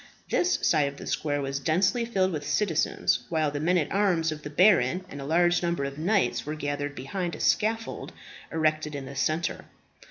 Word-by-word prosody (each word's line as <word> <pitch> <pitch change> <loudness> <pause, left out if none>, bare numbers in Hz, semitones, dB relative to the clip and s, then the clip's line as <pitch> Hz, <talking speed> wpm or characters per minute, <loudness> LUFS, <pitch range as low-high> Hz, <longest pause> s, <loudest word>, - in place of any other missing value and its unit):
This 360 +1 +2
side 150 -4 +3
of 140 0 -6
the - - -9
square 145 -2 -1
was 135 0 -2
densely 190 - +1
filled 190 -5 +1
with 150 -3 -4
citizens, 175 -7 +1
while 155 -3 +1
the 145 - -3
men 175 +4 +2
at 150 -4 -1
arms 180 -5 +2
of 155 -1 -6
the 150 - -7
baron 180 0 +3
and 140 - -8
a - - -6
large 175 +3 +3
number 170 -4 -1
of 140 +1 -5
knights 190 +4 +1
were 150 +1 -4
gathered 145 -1 -3
behind 170 +7 -4
a - - -10
scaffold 225 +1 0 0.4
erected 155 -1 0
in 140 -1 -5
the 135 +1 -9
centre. 155 +5 -1
155 Hz, 195 wpm, -27 LUFS, 145-185 Hz, 0.4 s, side